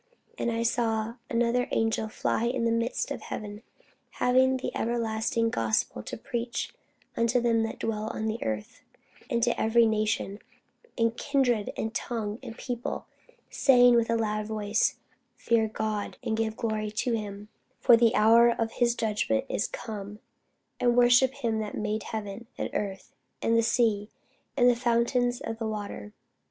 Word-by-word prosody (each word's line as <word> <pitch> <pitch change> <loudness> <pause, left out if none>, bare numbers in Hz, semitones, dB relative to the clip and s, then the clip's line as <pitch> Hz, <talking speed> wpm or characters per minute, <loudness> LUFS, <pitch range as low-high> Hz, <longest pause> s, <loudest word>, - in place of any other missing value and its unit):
And 235 - -1
I 230 0 -1
saw 230 -1 0
another 240 +1 +1
angel 225 -1 0
fly 220 +1 -1
in 240 0 0
the 230 - +2
midst 230 +2 -1
of - - -4
heaven, 210 0 -6 0.5
having 260 +1 +3
the 260 - -5
everlasting 230 0 0
gospel 110 - 0
to - - -7
preach 235 +1 -4 0.4
unto 235 +2 +2
them 230 -1 +2
that 225 0 -3
dwell 215 -1 -2
on 220 - -3
the 220 +1 -2
earth, 110 -1 -4 0.5
and 235 -1 +1
to 240 - +3
every 230 +1 +4
nation, 215 -2 0 0.6
and 230 -1 +2
kindred, 245 -6 +1
and 220 0 -3
tongue, 225 -2 -3
and 225 - -9
people, 245 -2 -4 0.5
saying 245 -2 +6
with 235 -1 +3
a 230 - +2
loud 215 -2 -1
voice, 215 0 0 0.4
Fear 230 -2 +1
God, 215 -1 -3
and 220 - -1
give 220 -1 -1
glory 215 -2 -2
to 230 +3 -1
him; 205 -2 -5 0.3
for 240 - +7
the 230 0 +3
hour 230 +2 +6
of 230 -1 -1
his 235 0 +1
judgment 210 - 0
is - - 0
come: 205 -2 -7 0.6
and 240 0 +2
worship 245 +1 +6
him 230 -5 -1
that 210 -1 -4
made 215 +1 -2
heaven, 215 +1 -6
and - - -3
earth, 195 -2 -4 0.3
and 230 - +1
the 230 - +5
sea, 220 -3 +1 0.5
and 245 -2 +5
the 245 - +5
fountains 245 +1 +1
of 225 -2 -5
waters. 205 - -4
225 Hz, 160 wpm, -28 LUFS, 215-235 Hz, 0.6 s, for